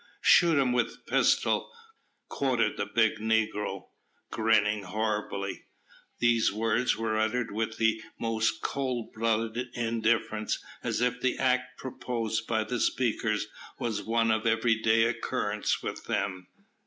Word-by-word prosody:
"Shoot 170 -3 +6
him 135 -3 +3
with 125 -1 -1
pistol," - - +2 0.6
quoth 120 -6 0
the 100 - -3
big 110 0 +2
negro, 110 -1 -1 0.4
grinning 105 -2 +2
horribly. 105 0 -3 0.5
These 120 -1 +3
words 115 +3 +1
were 110 -1 -1
uttered 115 +2 0
with 110 +1 -2
the 110 0 +2 0.2
most 115 -1 0
cold 130 -4 -2
blooded 115 +2 -1
indifference, 115 -2 0 0.3
as - - -1
if 125 0 0
the 130 - +1
act 130 0 0
proposed 115 -4 -3
by 110 -1 +1
the 125 +2 -3
speakers 110 -4 0 0.3
was 110 -3 -2
one 115 +2 +1
of 110 +1 0
everyday 115 0 +3
occurrence 115 0 -1
with - - -5
them. 95 -2 -2
115 Hz, 125 wpm, -28 LUFS, 110-120 Hz, 0.6 s, Shoot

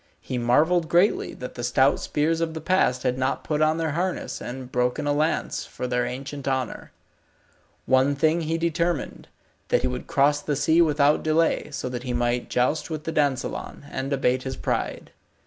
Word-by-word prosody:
He 125 - -4
marvelled 160 +8 +3
greatly 175 +4 +2
that 125 - -7
the 120 - -6
stout 130 +3 +3
spears 160 +2 0
of 160 -1 -2
the - - -3
past 155 -7 +1
had 125 0 0
not 130 +1 -1
put 150 -1 -1
on 155 +1 +3
their 165 -2 -1
harness 180 +4 -2
and 125 +1 -7
broken 125 +2 0
a 145 - +2
lance 155 +3 0
for - - -6
their 125 -1 0
ancient 135 +2 -6
honour. 130 -3 -2 0.9
One 130 +2 +3
thing 155 +4 +2
he 165 +1 -1
determined, 170 -1 -1 0.4
that - - +2
he - - +2
would 65 +1 -4
cross 145 +1 +3
the 145 0 -1
sea 160 +4 +3
without 150 -2 +3
delay, 160 +1 +1
so 140 -3 -4
that 125 -1 -4
he 125 -1 -4
might 120 0 0
joust 145 +6 0
with 155 -2 -4
the 160 - -3
dansellon, 145 -1 -2
and 135 +1 -3
abate 130 -2 +1
his 130 0 -5
pride. - - -3
145 Hz, 185 wpm, -25 LUFS, 125-160 Hz, 0.9 s, marvelled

